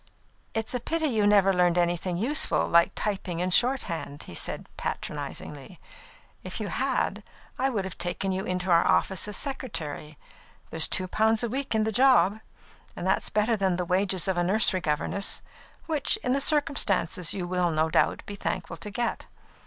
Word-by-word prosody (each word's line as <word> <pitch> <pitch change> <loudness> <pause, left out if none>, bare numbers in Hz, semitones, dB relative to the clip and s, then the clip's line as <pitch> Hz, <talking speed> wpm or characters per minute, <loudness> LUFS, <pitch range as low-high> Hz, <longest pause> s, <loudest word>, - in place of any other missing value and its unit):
"It 225 0 -1
is - - -1
a 250 - -1
pity 320 +6 -1
you 215 -4 +2
never 200 -2 +5
learned 180 -1 +2
anything 175 0 0
useful, 265 - +2
like 170 0 +4
typing 190 -5 -3
and 180 0 0
shorthand," 180 - 0
said - - -4
he - - -31
patronisingly. - - -6 0.6
"If - - -5
you - - -3
had, - - -1 0.4
I 265 +1 +2
would 205 -7 -2
have 190 - -8
taken 180 +2 -2
you 190 +1 -2
into 185 -1 -2
our 170 0 +5
office 190 +1 +1
as 210 - -2
secretary. 160 - -4 0.5
There's 160 -1 +6
two 185 - +1
pounds 220 +4 +2
a 235 - -1
week 265 0 -2
in 220 - +2
the 220 - -1
job, 230 -3 +4 0.6
and - - -5
that's 190 - +1
better 215 +2 +1
than 190 -3 +1
the 180 0 -2
wages 185 +1 +1
of 190 -2 0
a 175 - +2
nursery 190 0 +3
governess, 160 +5 -1 0.4
which, 315 +4 0
in 250 - +1
the 275 - +1
circumstances, 205 - +1
you 185 -3 -3
will, 180 -1 0
no 160 0 0
doubt, - - +1
be 205 - -7
thankful 180 -3 -4
to 210 - -7
get. 235 +3 -3
195 Hz, 180 wpm, -27 LUFS, 175-225 Hz, 0.6 s, There's